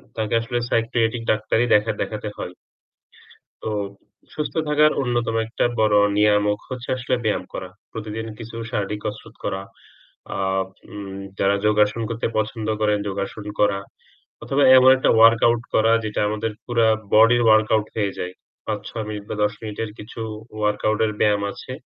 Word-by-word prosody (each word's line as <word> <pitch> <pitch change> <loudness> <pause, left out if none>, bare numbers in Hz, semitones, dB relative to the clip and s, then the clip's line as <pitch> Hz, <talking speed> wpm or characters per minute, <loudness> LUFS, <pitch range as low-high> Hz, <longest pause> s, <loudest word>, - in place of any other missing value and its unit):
তাকে 110 -1 -2
আসলে 120 +1 -2
সাইকিয়াট্রিক 115 0 +1
ডাক্তারই 110 +2 +1
দেখা 105 +2 +2
দেখাতে 105 0 -3
হয়। 90 - -6 1.1
তো - - -3 0.6
সুস্থ 150 - -3
থাকার 150 +1 +4
অন্যতম 120 -3 -1
একটা 115 - -2 0.2
বড় 110 -1 +4 0.2
নিয়ামক 105 0 +3
হচ্ছে 130 -1 -6
আসলে 125 +1 0
ব্যায়াম 105 -4 0
করা। 95 - -5 0.2
প্রতিদিন 110 0 -5
কিছু 115 0 -9 0.2
শারীরিক 105 0 -2
কসরত 105 - -6
করা। 95 - -2 0.7
আ - - -3 0.5
উম 100 -2 -7 0.2
যারা 100 +1 +3
যোগাসন 105 +1 +3
করতে 115 0 -2
পছন্দ 110 0 -2
করেন, 105 -1 +3
যোগাসন 100 +1 -4
করা। 100 -1 +3 0.6
অথবা 140 +1 +1
এমন 130 0 +8
একটা 130 - +2
ওয়ার্কআউট 115 +1 +5
করা 110 +1 +4
যেটা 105 -1 -2
আমাদের 110 +1 -2
পুরা 115 -2 +2 0.3
বডির 115 +2 +6
ওয়ার্কআউট 110 -1 +4
হয়ে 100 -3 0
যায়। 90 0 -4 0.3
৫-৬ 110 +1 -4
মিনিট 105 -1 -5
বা - - -1
১০ 105 0 +2
মিনিটের 110 0 -4
কিছু 110 +2 -9 0.4
ওয়ার্কআউটের 105 +1 +1
ব্যায়াম 105 -1 +3
আছে। - - -9
110 Hz, 145 wpm, -22 LUFS, 105-115 Hz, 1.1 s, এমন